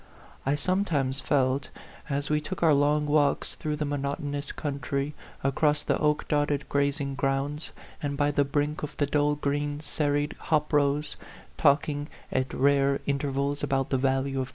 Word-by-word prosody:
I 140 - +3
sometimes 145 -6 0
felt, 135 -1 +1 0.4
as 140 +1 -1
we 150 0 +2
took 185 +2 -5
our 160 -2 +6
long 145 +1 +3
walks 145 -1 +2
through 150 -1 -3
the 150 0 -2
monotonous 145 0 -3
country, 140 0 -3 0.3
across 150 +2 +2
the - - +1
oak 150 0 +1
dotted 145 -1 0
grazing 140 0 0
grounds, 140 +2 -1 0.3
and 140 -1 -2
by 145 0 +2
the 145 0 +3
brink 145 +2 -1
of 150 0 -6
the 145 - +2
dull 145 +1 +2
green, 145 0 -1
serried 145 -1 0
hop 150 0 0
rows, 145 +1 +1 0.4
talking 145 0 +2 0.2
at 130 0 0
rare 140 0 +3
intervals 140 0 -1
about 135 -1 0
the 135 - +2
value 135 +1 +3
of 135 - +2
A 135 - -1
PHANTOM 135 -1 -2
LOVER. 130 0 -2
145 Hz, 170 wpm, -27 LUFS, 140-150 Hz, 0.4 s, our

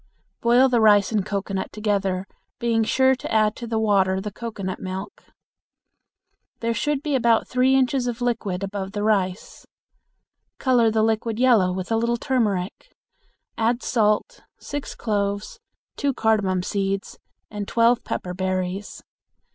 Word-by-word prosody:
Boil 240 +3 +5
the 245 -3 +2
rice 205 -2 +5
and 210 -3 +1
cocoanut 195 -1 -3
together, 195 -3 -1 0.3
being 230 -1 +1
sure 260 +4 +3
to - - -7
add 215 -1 +2
to 235 - -7
the 225 -1 -1
water 195 -3 +2
the 210 +2 -5
cocoanut 200 -4 -5
milk. 190 +2 -7 1.3
There 230 0 -1
should 285 +6 -1
be 300 - -1
about 235 -3 +3
three 255 +1 +3
inches 260 -1 +1
of 240 -1 -3
liquid 210 -6 -2
above 195 0 -4
the 205 -1 -2
rice. 195 -3 -1 0.9
Color 245 -4 +3
the 220 0 +1
liquid 220 0 0
yellow 230 -7 +4
with 185 +3 -5
a 225 - +3
little 235 +1 0
turmeric; 215 -8 -2 0.6
add 235 +2 +1
salt, 220 - +1 0.2
six 290 0 -6
cloves, 205 -2 -2 0.4
two 280 -2 0
cardamon 205 -5 +1
seeds, 195 0 -2 0.3
and 205 -1 -5
twelve 235 +1 +3
pepper 180 - -4
berries. 185 +1 -3
215 Hz, 140 wpm, -23 LUFS, 195-235 Hz, 1.3 s, Boil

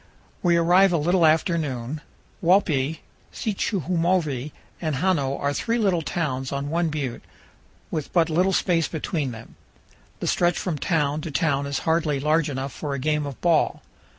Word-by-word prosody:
We 170 -2 +3
arrive 180 +3 +5
a 170 - +2
little 170 +2 +3
after 165 +2 +2
noon. 135 0 -4 0.4
Walpi, 160 -5 +2 0.3
Sichumovi, 170 - -1 0.3
and 155 -4 -1
Hano 140 -4 +1
are 140 0 0
three 230 +10 -1
little 195 -7 +2
towns 135 -5 -2
on 140 +1 -3
one 170 0 +1
butte, 140 -5 -3 0.7
with 155 -3 -3
but 170 -3 +3
little 180 +4 +2
space 170 -5 +2
between 155 -2 -2
them; 115 -1 -11 0.6
the - - -4
stretch 175 -1 +2
from 165 -6 -2
town 150 -2 0
to 165 - -5
town 145 -2 0
is 140 -1 -2
hardly 160 -3 +1
large 155 +2 +2
enough 135 0 -4
for 145 -2 -4
a - - -3
game 150 +2 0
of 140 - -8
ball. 170 -2 +2
155 Hz, 160 wpm, -24 LUFS, 140-175 Hz, 0.7 s, arrive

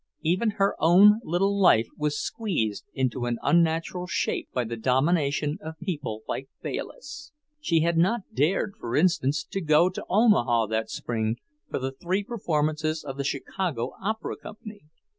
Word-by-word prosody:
Even 180 +8 +2
her 195 0 +2
own 200 +6 +7
little 195 +3 +1
life 115 -11 +6
was 150 -1 -1
squeezed 170 - -2
into 130 -2 -1
an 120 -1 -1
unnatural 170 +1 +1
shape - - -1
by 125 - 0
the 115 0 -4
domination 145 +5 +1
of 160 0 -7
people 145 - -4
like 135 - -4
Bayliss. 300 -10 -6 0.3
She 170 - +2
had 170 0 +2
not 210 +7 +2
dared, 155 - +1
for 115 - -3
instance, 155 -3 +2
to 195 - -5
go 160 +3 +4
to - - -6
Omaha 130 - +4
that 110 0 -1
spring 110 -1 -2 0.3
for - - -2
the 130 0 -3
three 180 +8 -2
performances 155 -7 -1
of 135 -2 -6
the 140 - -2
Chicago 140 -2 -2
Opera 220 +3 -3
Company. 215 -4 -11
160 Hz, 155 wpm, -26 LUFS, 135-190 Hz, 0.3 s, own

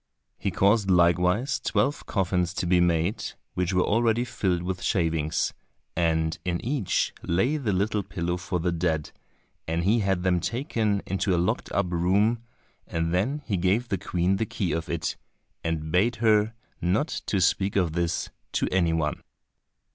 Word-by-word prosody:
He 100 - -1
caused 100 +2 +3
likewise 90 +7 +3
twelve 140 +2 0
coffins 90 -2 0
to - - -1
be 90 0 +4
made, 85 +3 +1 0.3
which 90 0 0
were 90 -1 +3
already 115 +2 +2
filled 90 -7 -1
with 90 0 -3
shavings, 80 -4 0 0.4
and 80 -1 +1
in 90 -2 -1
each 125 -6 0
lay 95 - +1
the 125 -8 -1
little 100 +3 +1
pillow 85 -2 -3
for 90 0 -3
the 90 +1 0
dead, 80 -3 -1 0.6
and 80 +1 0
he 105 +6 +3
had 95 -3 0
them 90 -1 +2
taken 110 - -1
into 95 0 0
a - - +1
locked 85 +2 -1
up 100 -3 0
room, 100 +7 +2 0.5
and 80 0 -1
then 130 +11 0
he 100 -5 0
gave 100 +7 +1
the 100 - 0
Queen 90 0 0
the 110 - 0
key 95 -3 -2
of 80 0 -2
it, 80 -1 -2 0.5
and 80 -2 -2
bade 105 +8 +3
her 110 -1 +3 0.3
not 95 - +1 0.2
to 100 - +1
speak 95 +2 +2
of 90 -5 +2
this 85 0 -1 0.2
to - - +1
any 85 -3 +2
one. 80 -2 -1
90 Hz, 165 wpm, -26 LUFS, 85-105 Hz, 0.6 s, be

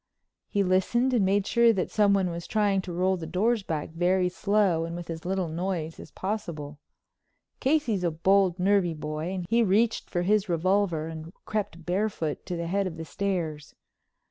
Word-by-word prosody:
He 200 -2 +1
listened 215 +8 +2
and 230 -5 +3
made 195 +1 +2
sure 235 +1 +4
that 190 -3 -2
someone 200 -4 +3
was 170 0 -6
trying 205 -3 +2
to 185 - -7
roll 185 +2 +1
the 165 -2 -6
doors 215 +7 +1
back 160 -5 -4
very 180 +2 +2
slow 195 -3 +1
and 165 +1 -5
with 175 -1 -6
as 165 0 -7
little 190 -1 -1
noise 165 -1 -3
as - - -10
possible. 165 -8 -5 0.8
Casey's 265 -9 +1
a 175 - +2
bold, 185 +2 +2
nervy 185 -2 +2
boy, 155 +2 -4
and 185 -2 -4
he 230 +5 +3
reached 220 +2 +2
for 175 -1 -1
his 210 +1 +2
revolver 175 -1 +1
and 160 0 -7
crept 205 -6 -3
barefooted 180 -4 -2
to 180 - -3
the 170 - -3
head 195 +3 0
of 165 -3 -7
the 160 - -6
stairs. 165 -6 -3
185 Hz, 180 wpm, -27 LUFS, 165-200 Hz, 0.8 s, sure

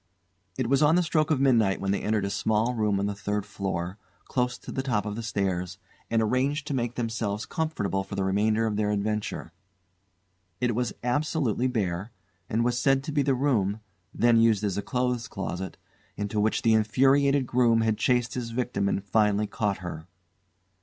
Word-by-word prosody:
It 130 - 0
was 135 +3 +3
on 155 +2 +5
the 180 - +3
stroke 155 -2 +1
of 155 -4 +2
midnight 115 -8 +3
when 95 0 -1
they 100 - 0
entered 105 -2 0
a 100 - -2
small 110 +4 +1
room 105 -4 +1
on 100 - 0
the 100 - -1
third 105 0 -3
floor, 95 -2 -4 0.3
close 125 -1 -1
to - - -10
the 130 - -2
top 115 -6 -1
of 105 -1 -3
the 115 - -4
stairs, 95 -5 -2 0.3
and 115 -1 +2
arranged 135 +6 0
to 145 - -3
make 120 -2 -1
themselves 110 -3 -2
comfortable 105 - -2
for 95 +1 -7
the 100 - 0
remainder 110 +4 +2
of 105 -2 -1
their 105 -1 +1
adventure. 105 +1 -2 1.1
It 125 -1 +1
was 120 -1 -1
absolutely 130 -2 0
bare, 100 -3 -2 0.4
and 115 +2 +1
was 120 0 +1
said 135 -1 +3
to 155 - -4
be 145 -1 +2
the 135 -1 +2
room 110 -7 +1 0.3
then 120 0 +3
used 115 -2 +4
as 100 -3 0
a 100 - -1
clothes 125 +1 -1
closet 95 -1 -5 0.4
into 105 +1 -2
which 110 +1 +1
the 115 - +4
infuriated 135 +5 +3
groom 120 -2 +3
had 110 -1 +1
chased 125 +1 +1
his 120 -2 -4
victim 115 -4 -1
and 100 - -1
finally 105 0 +2
caught 100 -2 -2
her. 80 -1 -6
110 Hz, 190 wpm, -27 LUFS, 100-125 Hz, 1.1 s, on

